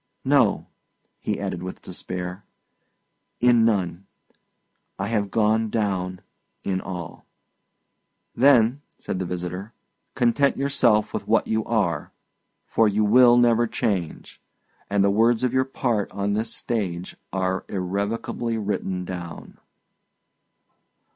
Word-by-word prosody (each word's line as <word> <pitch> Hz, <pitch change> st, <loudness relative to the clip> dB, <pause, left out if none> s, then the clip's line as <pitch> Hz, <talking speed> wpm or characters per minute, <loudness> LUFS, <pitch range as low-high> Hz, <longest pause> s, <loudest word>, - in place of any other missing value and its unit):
"No," -, -, +3 dB, 0.5 s
he -, -, -2 dB
added, 85 Hz, -, -3 dB
with 90 Hz, +1 st, -7 dB
despair; 90 Hz, +1 st, -5 dB, 1.0 s
"in 120 Hz, -1 st, +5 dB
none! 95 Hz, -4 st, 0 dB, 0.9 s
I 95 Hz, +1 st, -3 dB
have 105 Hz, -3 st, 0 dB
gone 110 Hz, +1 st, +2 dB
down 95 Hz, -4 st, -2 dB, 0.4 s
in 95 Hz, -1 st, -1 dB
all." 90 Hz, -3 st, -7 dB, 1.1 s
"Then," 125 Hz, 0 st, +4 dB, 0.2 s
said 95 Hz, -, -4 dB
the 95 Hz, -, -2 dB
visitor, 90 Hz, +4 st, -5 dB, 0.4 s
"content 135 Hz, +3 st, +2 dB
yourself 130 Hz, -6 st, +2 dB
with -, -, -4 dB
what -, -, +3 dB
you 110 Hz, 0 st, 0 dB
are, 105 Hz, -7 st, 0 dB, 0.5 s
for 115 Hz, -, +3 dB
you 105 Hz, +1 st, +2 dB
will 120 Hz, +3 st, +6 dB
never 120 Hz, -1 st, +4 dB
change; 100 Hz, -8 st, -3 dB, 0.5 s
and 100 Hz, -1 st, +2 dB
the 100 Hz, -, +3 dB
words 115 Hz, +3 st, +3 dB
of 125 Hz, -1 st, +1 dB
your 130 Hz, 0 st, +2 dB
part 120 Hz, -6 st, -1 dB
on 100 Hz, 0 st, -1 dB
this 110 Hz, +2 st, -1 dB
stage 95 Hz, -6 st, -3 dB, 0.2 s
are 95 Hz, 0 st, -1 dB
irrevocably 100 Hz, +5 st, -2 dB
written 95 Hz, -3 st, -2 dB
down." 85 Hz, -2 st, -8 dB
105 Hz, 115 wpm, -24 LUFS, 95-115 Hz, 1.1 s, will